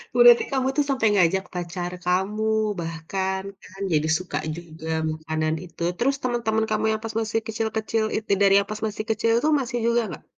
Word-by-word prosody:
Berarti 240 -1 +8
kamu 265 -1 +1
tuh, 295 - +3
sampai 260 -5 +2
ngajak 190 0 +3
pacar 175 0 -4
kamu, 190 +4 0 0.4
bahkan 180 +4 -3 0.2
kan 190 +1 -12
jadi 155 +1 +2
suka 185 - -4 0.2
juga, 160 -2 -10 0.2
makanan 155 0 -2
itu. 170 -1 -15 0.2
Terus, 275 +3 +2
teman-teman 230 -3 0
kamu - - +1
yang 220 0 -2
pas 225 0 -5
masih 225 0 0
kecil-kecil 220 0 -1
itu 215 -2 -4
dari 195 -1 +6
yang 200 - -2
pas 215 0 -5
masih 215 0 -4
kecil 220 +1 +1
itu, 300 - +1
masih 245 -1 -3
juga 235 0 +3
nggak? 170 - -8
210 Hz, 180 wpm, -24 LUFS, 175-225 Hz, 0.4 s, Berarti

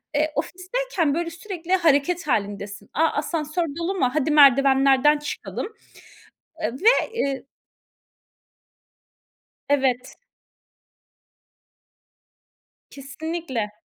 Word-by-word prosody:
Eee, 305 +1 +1
ofisteyken, 365 - -2
böyle, 335 +2 -2
sürekli 350 +1 -5
hareket 335 0 +2
hâlindesin. 200 -4 -3
A, 320 +3 +3
asansör 310 +2 -2
dolu 350 +4 -2
mu? 260 -9 +1
Hadi 305 0 0
merdivenlerden 275 0 +5
çıkalım. 295 +6 -5 1.0
Iıı, - - 0
ve, 300 - -2 0.3
eee 275 - -2 2.2
Evet. 260 -3 0 2.7
Kesinlikle. 280 -4 -5
300 Hz, 80 wpm, -23 LUFS, 270-335 Hz, 2.7 s, merdivenlerden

